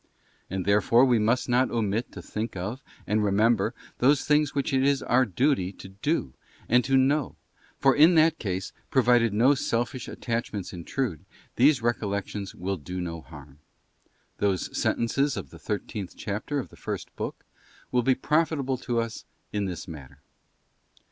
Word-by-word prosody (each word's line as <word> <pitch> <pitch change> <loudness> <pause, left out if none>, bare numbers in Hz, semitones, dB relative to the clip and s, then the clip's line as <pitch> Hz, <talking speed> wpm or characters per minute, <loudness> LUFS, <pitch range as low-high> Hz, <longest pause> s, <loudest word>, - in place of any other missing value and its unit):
And 95 -1 -3
therefore 105 +5 +5
we 125 -3 +3
must 115 +4 +1
not 125 +1 +3
omit 110 0 -1
to - - -8
think 110 +1 -4
of, 100 +9 -4 0.2
and 105 0 +1
remember, 110 +3 +2 0.2
those 135 +3 +4
things 150 -1 +2
which 140 0 -1
it 130 0 +3
is 140 0 +2
our 130 +2 +3
duty 110 - +1
to 95 - -11
do 100 - -2 0.3
and 125 +2 +4
to 135 0 +3
know; 140 +2 +2 0.4
for 135 -1 +4
in 160 +4 +6
that 160 0 +4
case, 95 -3 -3 0.2
provided 120 -3 +4
no 120 +7 +4
selfish 120 -1 -2
attachments 115 -6 -4
intrude, 90 - -3 0.3
these 130 -1 +4
recollections 100 -3 -2
will 95 +2 -3
do 90 +4 -6
no 85 -2 -4
harm. 75 -3 -13 0.8
Those 95 -3 0
sen - - +1
tences 140 +5 +1
of - - -6
the - - -12
thirteenth 105 -2 -4
chapter 105 +8 -3
of 135 - -3
the - - -16
first - - -6
book - - -5 0.5
will 125 - +3
be 130 +2 +3
profitable 140 -3 0
to 120 -2 -2
us 115 -1 -4 0.3
in 105 -1 0
this 90 -2 -5
matter. 75 -6 -10
115 Hz, 160 wpm, -27 LUFS, 100-135 Hz, 0.8 s, in